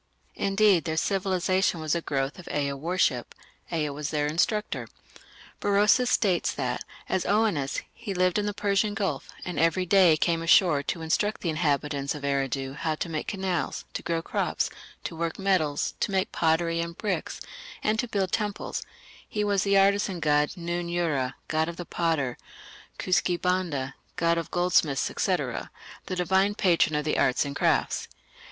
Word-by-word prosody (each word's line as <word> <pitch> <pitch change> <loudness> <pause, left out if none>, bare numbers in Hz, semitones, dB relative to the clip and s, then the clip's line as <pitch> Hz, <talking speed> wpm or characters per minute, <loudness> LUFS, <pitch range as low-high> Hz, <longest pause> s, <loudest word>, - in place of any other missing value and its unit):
Indeed, 195 -3 +3
their 160 -1 -2
civilization 185 -1 +1
was 155 -2 -1
a 170 - 0
growth 135 +1 -2
of 180 - -11
Ea 140 -1 0
worship. 145 -4 0 0.4
Ea 155 -3 0
was 145 +1 -4
their 150 -1 0
instructor. 175 +8 0 0.7
Berosus 210 +5 +4
states 195 -8 +2
that, - - -2 0.2
as 190 - 0
Oannes, 200 -10 +1
he 210 -4 -6
lived 185 +2 +2
in 205 - -1
the - - 0
Persian 205 0 +1
Gulf, 195 -2 -2 0.2
and 180 -4 -3
every 165 +3 +2
day 180 -4 +5
came 165 +1 +1
ashore 165 -3 +5
to 165 +3 -3
instruct 205 +6 0
the 170 - 0
inhabitants 145 -3 0
of 145 - -8
Eridu 135 -1 -1
how 160 -1 -1
to 170 - -4
make 155 -2 -3
canals, 190 -3 -2
to - - -3
grow 165 -1 -2
crops, - - -1 0.3
to - - -5
work 165 0 -2
metals, 180 -7 +1
to - - 0
make 190 -1 0
pottery 165 +1 +1
and 170 0 -4
bricks, 205 -4 -2 0.4
and 215 +1 +1
to 245 - 0
build 195 -4 -1
temples; 210 -2 -2 0.5
he 210 - -1
was 200 -2 +2
the 200 0 +3
artisan 195 -1 +3
god 150 +2 +2
Nun 175 0 -3
ura, 155 -7 0
"god 160 +1 0
of 170 - -7
the 175 - -5
potter"; 160 -9 -1 0.6
Kuski 180 -1 +1
banda, 170 -8 -1 0.2
"god 170 0 +2
of 165 - -5
goldsmiths", 170 -6 +2
&c. - - +2
the - - -5 0.4
divine 190 +3 +2
patron 170 -6 +3
of 150 0 -1
the 155 - +1
arts 125 - +2
and 140 0 -5
crafts. - - +1
170 Hz, 165 wpm, -27 LUFS, 155-195 Hz, 0.7 s, day